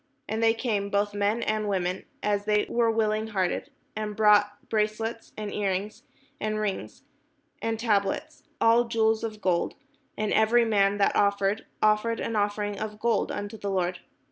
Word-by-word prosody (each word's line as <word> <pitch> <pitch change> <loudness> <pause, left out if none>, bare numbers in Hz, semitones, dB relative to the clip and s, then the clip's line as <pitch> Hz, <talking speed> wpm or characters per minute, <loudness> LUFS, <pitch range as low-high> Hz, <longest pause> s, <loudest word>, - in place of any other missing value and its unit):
And 220 +2 -2
they 225 0 +4
came, 210 -4 -1
both 205 0 0
men 205 +3 0
and 215 -1 -1
women, 185 -1 -1 0.2
as 205 0 0
many 210 -1 +3
as - - -10
were 235 -1 +2
willing 220 -1 +1
hearted, 190 -4 -1 0.3
and 210 -1 -3
brought 205 -1 +3
bracelets, 220 +1 -2
and 210 -1 -4
ear 205 -1 0
rings, 195 +3 -3 0.4
and 215 0 -1
rings, 205 -3 -4 0.6
and 225 -1 -1
tablets, 220 +7 0 0.2
all 230 +1 +5
jewels 225 -1 +1
of 215 -2 -5
gold: 180 -3 0 0.4
and 215 0 0
every 230 +2 +4
man 200 -2 +3
that 200 - +2
offered 200 +1 +1 0.2
offered 215 +2 +2
an 230 - -2
offering 205 0 -1
of 215 -1 -5
gold 230 -1 +1
unto 205 +2 -5
the 200 - -3
Lord. 180 -2 -1
210 Hz, 170 wpm, -27 LUFS, 205-220 Hz, 0.6 s, all